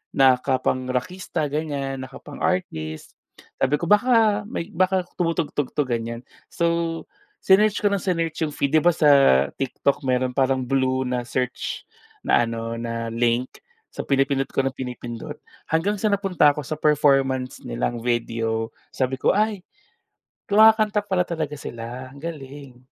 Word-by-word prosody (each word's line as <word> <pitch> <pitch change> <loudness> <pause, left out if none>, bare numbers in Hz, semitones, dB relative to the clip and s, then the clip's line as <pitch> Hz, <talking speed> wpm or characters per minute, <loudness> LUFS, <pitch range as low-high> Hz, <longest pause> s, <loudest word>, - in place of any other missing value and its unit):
nakapang-rakista, 130 +5 +1
ganiyan, 140 -3 -3
nakapang-artist. 130 - -4 0.5
Sabi 140 +3 +2
ko 170 - -3
baka 210 0 +4
may 195 -4 -5
baka 185 0 +1 0.2
tumutugtog 165 -5 -1
'to, 150 - +2
ganiyan. 115 0 -3 0.3
So, 170 -1 -1 0.4
sinearch 205 +2 +4
ko 205 - +3
nang 200 -2 0
sinearch 165 -4 -1
'yong 150 -2 -1
feed, 140 - 0
'di 155 - +5
ba 175 -1 +3
sa 150 -3 +4 0.5
TikTok 135 +1 0
meron 125 0 +1
parang 130 -1 +1
blue 130 0 +1
na 125 -1 -1
search 125 0 -3 0.4
na 120 - +3
ano, 115 0 -4
na 115 -1 -4
link. 120 +2 +1 0.4
So - - -5
pinipindot 135 0 +1
ko - - -1
nang 135 -1 -2
pinipindot. 120 -2 -7 0.3
Hanggang 185 +6 +1
sa 220 - +1
napunta 190 -7 +3
ako 150 +1 -5
sa 155 - -2
performance 135 -4 +2
nilang - - -2
video 115 -1 -1 0.2
sabi 130 0 -1
ko, - - +3
"Ay, 210 -3 0 0.9
kumakanta 215 0 +5
pala 185 -3 +1
talaga 155 -4 -3
sila." 120 +3 -7
Ang 140 +1 -14
galing. 140 -5 -8
140 Hz, 140 wpm, -23 LUFS, 125-170 Hz, 0.9 s, di